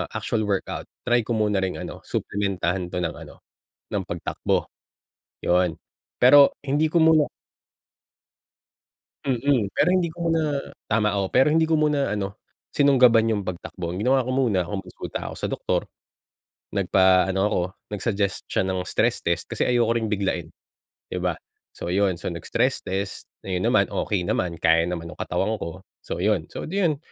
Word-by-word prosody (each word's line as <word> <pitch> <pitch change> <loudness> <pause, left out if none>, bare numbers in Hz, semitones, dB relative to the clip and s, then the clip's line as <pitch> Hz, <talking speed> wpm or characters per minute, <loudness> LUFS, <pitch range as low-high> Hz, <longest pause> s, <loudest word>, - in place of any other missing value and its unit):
actual 110 -2 -1
workout, 100 -2 -2 0.2
try 120 0 +4
ko 120 - 0
muna 105 -2 +1
ring 95 -1 -1
ano, - - -7
suplementahan 95 -3 -1
'to 90 - -5
ng - - -2
ano - - -13 0.5
ng - - 0
pagtakbo. - - -2 0.8
Yun, 90 -2 +2 0.4
pero 140 +3 +7
hindi 150 +3 +2
ko 170 - +3
muna 160 -2 +5 2.0
Mm, 125 -5 +1
pero 155 - +2
hindi 180 -3 +2
ko 170 0 -3
muna 155 -4 +1 0.2
tama 105 -2 +1
oo, 95 -1 -1
pero 130 +3 +5
hindi 160 +1 +3
ko 160 -1 +2
muna 145 -6 +1
ano, 100 -1 -4 0.2
sinunggaban 125 -5 +5
yung 105 - 0
pagtakbo, 90 -1 -6
ang 90 - -4
ginawa 130 +1 +4
ko 125 +1 -2
muna 100 -10 +1
kung 100 -2 -4
kumunsulta - - -6
ako - - -8
sa - - -1
doktor, - - -1 0.9
nagpa-ano 95 0 +3
ako 100 - +1 0.3
nag-suggest 100 -2 -2
siya 95 - +1
ng 95 -1 -1
stress - - 0
test 85 0 -1
kasi - - -3
ayoko 115 -1 +3
rin 110 -2 -1
biglain, 95 -5 -1 0.6
di 90 - -2
ba? 90 -3 -1 0.4
So 85 - -4
ayun, 95 -2 +2
so 85 - -4
nag-stress 120 +9 0
test, 95 +1 -4 0.2
ayun 90 -1 -1
naman - - +3
okey 95 -4 -1
naman 85 -1 -1
kaya 85 +1 +3
naman 85 -2 -5
yung - - -13
katawan 110 +2 -1
ko. 85 -1 -7 0.2
So - - -5
yun, 100 -6 +1
so - - -6
di 195 +5 -2
yun 160 -6 +2
105 Hz, 165 wpm, -24 LUFS, 90-130 Hz, 2.0 s, pero